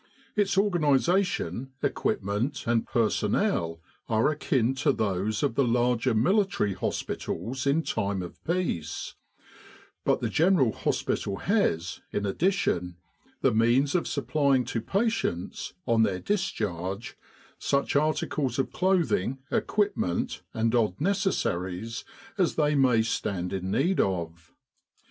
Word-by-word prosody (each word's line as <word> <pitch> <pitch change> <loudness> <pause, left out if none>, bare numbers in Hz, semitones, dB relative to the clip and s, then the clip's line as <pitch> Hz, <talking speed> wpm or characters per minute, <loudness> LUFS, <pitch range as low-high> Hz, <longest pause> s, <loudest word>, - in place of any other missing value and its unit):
Its 200 -3 +1
organisation, 160 - +1
equipment, 110 +8 -1
and 115 -1 +1
personnel 85 -7 +1 0.3
are 110 +5 +3
akin 135 -5 +1
to 145 +2 +2
those 105 -2 -1
of - - +1
the 140 - +2
larger 120 0 +2
military 180 - +2
hospitals 125 +9 -3
in 150 +4 +3
time 100 -7 -1
of 85 - -10
peace; 165 - -2 0.9
but - - +2
the - - -1
General 165 -8 +3
Hospital 100 -1 -1
has, 90 - 0
in 105 - -1
addition, 95 - 0 0.4
the 135 - +3
means 120 +6 +3
of 180 - +1
supplying 140 -4 +1
to 115 -1 -2
patients, 195 - -1
on 115 -2 +3
their 100 -4 +2
discharge, 105 - -2 0.4
such 140 0 0
articles 145 -3 0
of 135 - -1
clothing, 175 - +1
equipment, 200 - 0
and 115 +1 0
odd 110 -6 +1
necessaries 115 - -1 0.4
as 180 - +2
they 150 -1 +2
may 130 -5 +4
stand 95 -5 -2
in 95 -1 -3
need 180 - +1
of. 85 -4 -2
120 Hz, 115 wpm, -27 LUFS, 100-155 Hz, 0.9 s, may